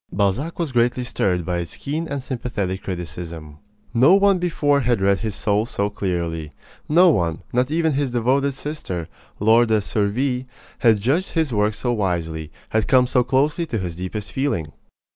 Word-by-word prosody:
Balzac 100 Hz, -, 0 dB
was 165 Hz, -5 st, -2 dB
greatly 120 Hz, +1 st, +2 dB
stirred 90 Hz, -8 st, -1 dB
by 90 Hz, -1 st, -1 dB
its 85 Hz, -2 st, -6 dB
keen 155 Hz, +4 st, -3 dB
and 140 Hz, -3 st, -4 dB
sympathetic 115 Hz, -8 st, -3 dB
criticism. 85 Hz, -4 st, -7 dB, 0.3 s
No 135 Hz, +10 st, +6 dB
one 200 Hz, -1 st, +4 dB
before 150 Hz, -5 st, +1 dB
had 120 Hz, -3 st, +1 dB
read 100 Hz, 0 st, +2 dB
his 110 Hz, -3 st, -3 dB
soul 105 Hz, +2 st, 0 dB
so 100 Hz, -3 st, -1 dB
clearly. 85 Hz, -6 st, -3 dB, 0.4 s
No 175 Hz, +3 st, +6 dB
one 85 Hz, -, -1 dB
not 125 Hz, +2 st, +2 dB
even 160 Hz, 0 st, +1 dB
his 140 Hz, -1 st, 0 dB
devoted 130 Hz, +3 st, +1 dB
sister, 135 Hz, -, -5 dB, 0.3 s
Laure 115 Hz, +3 st, +5 dB
de 110 Hz, -1 st, +3 dB
Surville 125 Hz, +6 st, -1 dB, 0.3 s
had 115 Hz, -3 st, +4 dB
judged 145 Hz, -, 0 dB
his 160 Hz, -6 st, 0 dB
work 105 Hz, 0 st, +1 dB
so 120 Hz, +2 st, -1 dB
wisely, 85 Hz, -7 st, -2 dB, 0.2 s
had 110 Hz, -1 st, 0 dB
come 130 Hz, -1 st, +5 dB
so 125 Hz, 0 st, +2 dB
closely 145 Hz, +6 st, +1 dB
to 115 Hz, -, -2 dB
his 90 Hz, -4 st, -4 dB
deepest 95 Hz, +4 st, -5 dB
feeling. 90 Hz, -, -1 dB
115 Hz, 170 wpm, -22 LUFS, 95-140 Hz, 0.4 s, No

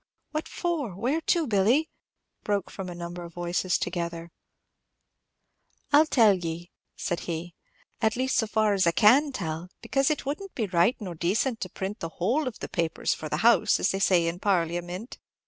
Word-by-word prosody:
"What 310 Hz, +1 st, -3 dB
for? 305 Hz, -, -2 dB
Where 255 Hz, -, 0 dB
to, 335 Hz, 0 st, +2 dB
Billy?" 230 Hz, +7 st, +2 dB, 0.5 s
broke 205 Hz, -3 st, -1 dB
from 190 Hz, -2 st, -6 dB
a 175 Hz, -, -7 dB
number 175 Hz, 0 st, -6 dB
of 170 Hz, -1 st, -11 dB
voices 175 Hz, +1 st, 0 dB
together. 170 Hz, -1 st, -4 dB, 1.6 s
"I 290 Hz, -, +9 dB
'll 310 Hz, -, +4 dB
tell 225 Hz, -8 st, +5 dB
ye," 170 Hz, -1 st, -5 dB, 0.2 s
said 175 Hz, -, -2 dB
he, 170 Hz, +1 st, -4 dB, 0.5 s
"at 220 Hz, 0 st, +2 dB
least 260 Hz, +1 st, 0 dB
so 225 Hz, -, +2 dB
far 215 Hz, -1 st, +2 dB
as 190 Hz, -3 st, +2 dB
I 170 Hz, -, +3 dB
can 265 Hz, -, +5 dB
tell; 170 Hz, -7 st, -4 dB
because 270 Hz, -1 st, +1 dB
it 305 Hz, -, -1 dB
would 285 Hz, +6 st, -2 dB
n't 390 Hz, -1 st, -10 dB
be 225 Hz, -, 0 dB
right 180 Hz, +5 st, +2 dB
nor 190 Hz, -5 st, -5 dB
decent 215 Hz, -, 0 dB
to -, -, -3 dB
'print 195 Hz, +2 st, -5 dB
the 165 Hz, -, -4 dB
whole 255 Hz, -, +1 dB
of 245 Hz, -, -5 dB
the -, -, -6 dB
papers 165 Hz, -2 st, -1 dB
for 155 Hz, -, -6 dB
the -, -, -1 dB
house,' 235 Hz, 0 st, +5 dB
as -, -, +2 dB
they 195 Hz, -, -2 dB
say 180 Hz, -3 st, +3 dB
in 165 Hz, +1 st, -2 dB
parliamint. 175 Hz, +2 st, -1 dB
195 Hz, 190 wpm, -27 LUFS, 175-250 Hz, 1.6 s, I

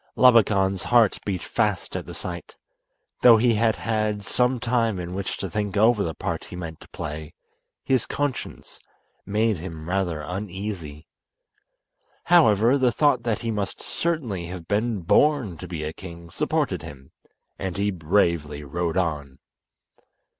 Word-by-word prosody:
Labakan's 100 Hz, -6 st, +5 dB
heart 120 Hz, -4 st, +3 dB
beat 95 Hz, -3 st, -2 dB
fast -, -, -1 dB
at -, -, -4 dB
the -, -, -8 dB
sight. -, -, -7 dB, 0.7 s
Though 120 Hz, -2 st, +8 dB
he 120 Hz, +1 st, +3 dB
had 110 Hz, 0 st, +2 dB
had 110 Hz, -2 st, -1 dB
some 125 Hz, +4 st, +1 dB
time 115 Hz, -3 st, +1 dB
in 90 Hz, 0 st, -5 dB
which 95 Hz, +1 st, -3 dB
to 95 Hz, -, -3 dB
think 100 Hz, +2 st, -2 dB
over 110 Hz, +1 st, +4 dB
the 80 Hz, -2 st, -3 dB
part -, -, -3 dB
he -, -, -9 dB
meant 85 Hz, -3 st, -7 dB
to -, -, -15 dB
play 75 Hz, 0 st, -6 dB, 0.5 s
his 130 Hz, -3 st, +1 dB
conscience 145 Hz, -2 st, -4 dB, 0.5 s
made 105 Hz, 0 st, +1 dB
him 80 Hz, -2 st, -8 dB
rather 90 Hz, -4 st, -1 dB
uneasy. 90 Hz, -4 st, -5 dB, 1.2 s
However, 125 Hz, -, +5 dB
the 125 Hz, -2 st, +3 dB
thought 140 Hz, 0 st, +3 dB
that 115 Hz, -3 st, -1 dB
he 115 Hz, -, 0 dB
must 105 Hz, -2 st, -3 dB
certainly 125 Hz, -, -2 dB
have 85 Hz, -2 st, -8 dB
been 105 Hz, 0 st, 0 dB
born 125 Hz, -, +3 dB
to 90 Hz, -, -8 dB
be 85 Hz, -3 st, -5 dB
a 75 Hz, +1 st, -4 dB
king 85 Hz, -2 st, -10 dB
supported -, -, -1 dB
him, 65 Hz, -1 st, -11 dB, 0.5 s
and 95 Hz, -1 st, -3 dB
he 100 Hz, +1 st, +1 dB
bravely 80 Hz, -4 st, 0 dB
rode 85 Hz, +4 st, -2 dB
on. 75 Hz, -7 st, -2 dB
100 Hz, 150 wpm, -24 LUFS, 85-115 Hz, 1.2 s, Though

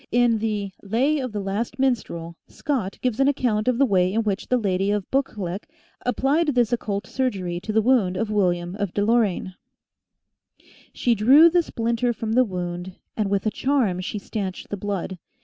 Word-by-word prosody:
In 240 Hz, -2 st, +3 dB
the 210 Hz, -3 st, -2 dB
" -, -, -30 dB
Lay 255 Hz, +9 st, +1 dB
of 255 Hz, -3 st, -3 dB
the 210 Hz, -, -3 dB
Last 200 Hz, +4 st, -3 dB
Minstrel," 200 Hz, -11 st, -1 dB
Scott 245 Hz, -10 st, -3 dB
gives 250 Hz, -2 st, 0 dB
an 270 Hz, -, +4 dB
account 240 Hz, -6 st, +1 dB
of 250 Hz, -2 st, +2 dB
the 275 Hz, -, +4 dB
way 185 Hz, -5 st, +2 dB
in 225 Hz, +3 st, 0 dB
which 205 Hz, -3 st, -2 dB
the 250 Hz, -, +2 dB
Lady 195 Hz, -3 st, 0 dB
of 205 Hz, -2 st, 0 dB
Buccleuch 205 Hz, -8 st, -2 dB, 0.4 s
applied 275 Hz, +6 st, +1 dB
this 240 Hz, -1 st, +2 dB
occult 205 Hz, -4 st, -2 dB
surgery 190 Hz, -10 st, -2 dB
to 205 Hz, +4 st, -5 dB
the 220 Hz, 0 st, +2 dB
wound 215 Hz, -7 st, +2 dB
of 215 Hz, +1 st, -2 dB
William 175 Hz, -4 st, 0 dB
of 200 Hz, -4 st, -3 dB
Deloraine: 205 Hz, -3 st, +1 dB, 1.1 s
<4 -, -, -28 dB, 0.3 s
She 240 Hz, -, +1 dB
drew 270 Hz, +10 st, +7 dB
the 350 Hz, 0 st, +4 dB
splinter 235 Hz, -4 st, -1 dB
from 225 Hz, -1 st, -4 dB
the 255 Hz, +2 st, +5 dB
wound, 180 Hz, -3 st, -5 dB, 0.2 s
And 210 Hz, -3 st, -1 dB
with 200 Hz, 0 st, 0 dB
a 215 Hz, -, +1 dB
charm 250 Hz, -11 st, +1 dB
she 185 Hz, +3 st, -4 dB
stanched 195 Hz, -2 st, -5 dB
the -, -, -2 dB
blood. 190 Hz, -2 st, -4 dB
215 Hz, 185 wpm, -23 LUFS, 195-245 Hz, 1.1 s, drew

